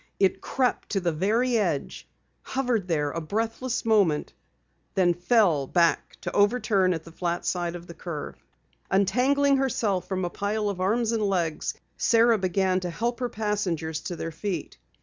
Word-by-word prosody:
It 195 -1 +2
crept 255 -2 -1
to 200 - 0
the 175 -2 0
very 225 +9 +1
edge, 170 -9 -2 0.3
hovered 245 -7 -1
there 150 -4 0
a 165 - -4
breathless 225 +8 -2
moment, 200 -9 +2 0.6
then 180 -2 +4
fell 175 - +2
back 170 +1 +1
to - - -4
overturn 205 -3 +3
at 160 - -6
the 165 - -12
flat 175 +1 -3
side 175 -1 -1
of 175 0 -8
the 170 - -10
curve. 165 -3 -7 0.5
Untangling 270 +8 +3
herself 220 -8 0
from 185 -2 -1
a 175 - -3
pile 205 +1 -1
of 190 -2 -4
arms 225 +4 +1
and 225 -2 0
legs, 175 -6 -1 0.2
Sara 230 -1 +4
began 185 0 +1
to 180 -1 -4
help 235 +8 -2
her 245 -1 -1
passengers 185 -8 -2
to 175 - -5
their 165 - -4
feet. 170 -1 -5
195 Hz, 165 wpm, -26 LUFS, 170-225 Hz, 0.6 s, then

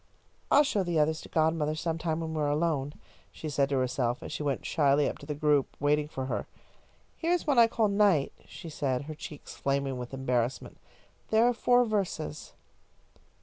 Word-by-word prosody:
"I'll 290 - +6
show 240 -8 0
the 175 -3 -1
others 155 +1 +2
to - - -12
godmother 155 -1 +1
sometime 165 0 -2
when 160 -1 -4
we 155 - -1
are 145 - +1
alone," 145 -2 0 0.4
she 155 - -6
said 140 -1 +1
to 140 - +1
herself, 125 -1 -1
as - - -7
she - - -4
went 140 -3 -2
shyly 145 -2 +3
up - - -4
to 145 - -12
the 150 - -3
group 150 -2 +1
waiting 150 +1 +2
for 130 -3 -5
her, 130 - -3 0.7
"Here 335 +1 0
is 355 - 0
one 285 -6 +3
I 230 - +8
called 225 -2 +1
'Night,'" 200 -8 +3
she - - -10
said, 140 -4 -2
her 155 +2 -7
cheeks 150 -1 -9
flaming 135 -2 -1
with 125 -1 -6
embarrassment. 125 -2 -2 0.5
"There 220 +2 +4
are 245 - +3
four 245 +1 +3
verses." 190 -8 -3
150 Hz, 190 wpm, -29 LUFS, 140-175 Hz, 0.7 s, I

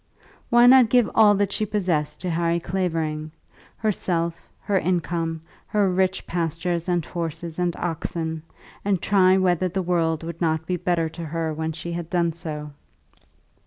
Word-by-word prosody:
Why 240 0 +6
not 250 -2 +7
give 245 -2 +4
all 210 -2 +6
that 200 0 0
she 215 - -1
possessed 185 -8 -1
to 180 -1 -2
Harry 170 +1 +1
Clavering 160 -4 -2 0.5
herself, 170 -6 -2
her 200 -2 +1
income, 170 -2 -1 0.3
her 205 -3 +2
rich 185 0 0
pastures 170 +1 -2
and 175 -3 +1
horses 170 -1 -4
and 175 -1 0
oxen, 160 -1 -3 0.4
and 195 -2 +1
try 190 0 +4
whether 185 -1 +2
the 185 +1 -2
world 165 -2 0
would 170 +1 -7
not 160 -1 0
be 180 - -1
better 170 -1 0
to 165 +1 -7
her 160 0 -2
when 160 +1 -3
she 170 +2 -6
had 170 -1 -5
done 170 -2 +1
so? 150 -3 -6
170 Hz, 160 wpm, -24 LUFS, 165-185 Hz, 0.5 s, not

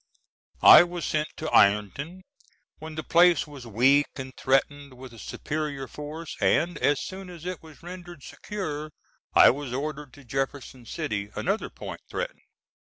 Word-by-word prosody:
I - - +11
was 175 -1 -3
sent 155 0 0
to 155 - -4
Ironton 125 - +2 0.6
when 155 0 -8
the 155 - -4
place 175 +2 +4
was 140 -5 -11
weak 130 +6 +4
and 130 -1 -7
threatened 140 +1 0
with 125 -1 -11
a 115 - -12
superior 145 -1 -4
force, 150 +3 -7
and 170 +3 +2
as 145 -2 +2
soon 190 0 -7
as 175 -2 -11
it 180 -2 -4
was 160 -2 -16
rendered 175 -3 -10
secure 155 -8 -5 0.5
I - - +9
was 140 0 -6
ordered 145 +1 -4
to 145 - -15
Jefferson 135 -1 -4
City, 100 -1 -3
another 200 +4 -1
point - - -8
threatened. - - -4
150 Hz, 155 wpm, -26 LUFS, 135-170 Hz, 0.6 s, I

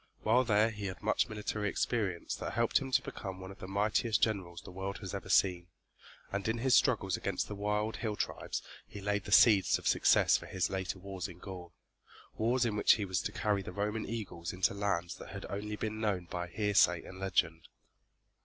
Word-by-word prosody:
While 120 +4 +4
there 110 0 +3
he 105 -2 -5
had 95 +3 -7
much 105 +3 +1
military 105 -1 -2
experience 100 -6 -1
that - - -5
helped 115 -1 +2
him 135 -2 -6
to - - +3
become 95 -3 -6
one 95 +1 -8
of 95 - -13
the 95 - -7
mightiest 105 +3 +1
generals 95 -6 -1
the - - -10
world 95 +2 -4
has 95 -3 -7
ever 100 - -5
seen, 90 -2 +3 0.6
and 100 +1 -2
in 110 +1 0
his 130 +2 +2
struggles 100 -8 +3
against 100 -2 -2
the - - -5
wild, 105 +2 -1
hill 110 -3 -2
tribes - - -3 0.2
he 100 - -9
laid 105 0 -1
the - - -7
seeds 105 -2 +6
of - - -5
success - - +5
for - - -10
his 95 0 -1
later 95 0 -2
wars 95 0 -5
in 90 -3 -11
Gaul, 90 -2 -9 0.6
wars 120 +3 +2
in 110 -3 0
which 105 - +6
he 105 - -1
was 95 -2 -1
to - - -3
carry 105 -2 0
the 95 - -7
Roman 105 +3 -2
eagles 90 -7 -4
into 90 +1 +1
lands 100 -4 -1
that - - -10
had 100 0 -7
only 105 +1 -3
been 110 0 -4
known 100 -5 0
by 90 0 -4
hearsay 90 -2 +3
and 95 - -10
legend. 85 -4 0
100 Hz, 210 wpm, -32 LUFS, 95-110 Hz, 0.6 s, seeds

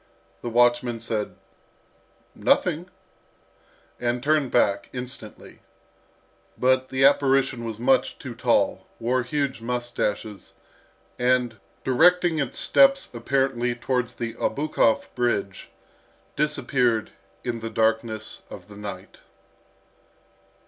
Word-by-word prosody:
The 120 - -4
watchman 120 0 +3
said, 110 -2 -3 1.0
"Nothing," - - +1 1.1
and 120 0 -1
turned 150 -2 +2
back 100 -5 +1
instantly. 125 -3 -8 1.0
But 130 0 +2
the 135 0 +3
apparition 135 -3 +3
was 110 -1 -5
much 130 +1 +2
too 130 -3 -7
tall, 115 - +1
wore 125 +2 +1
huge 135 0 -2
moustaches, 115 -4 -3 0.7
and, 125 -3 +1 0.2
directing 170 +4 +4
its 140 -4 -2
steps 275 0 +4
apparently 125 0 0
towards 125 0 -2
the 115 -1 -4
Obukhov 140 -6 +1
Bridge, 105 -6 -2 0.7
disappeared 125 -6 0 0.3
in 120 -2 -3
the 115 0 -5
darkness 110 0 -1
of - - -11
the 100 - -12
night. 105 -2 -8
120 Hz, 100 wpm, -24 LUFS, 115-135 Hz, 1.1 s, directing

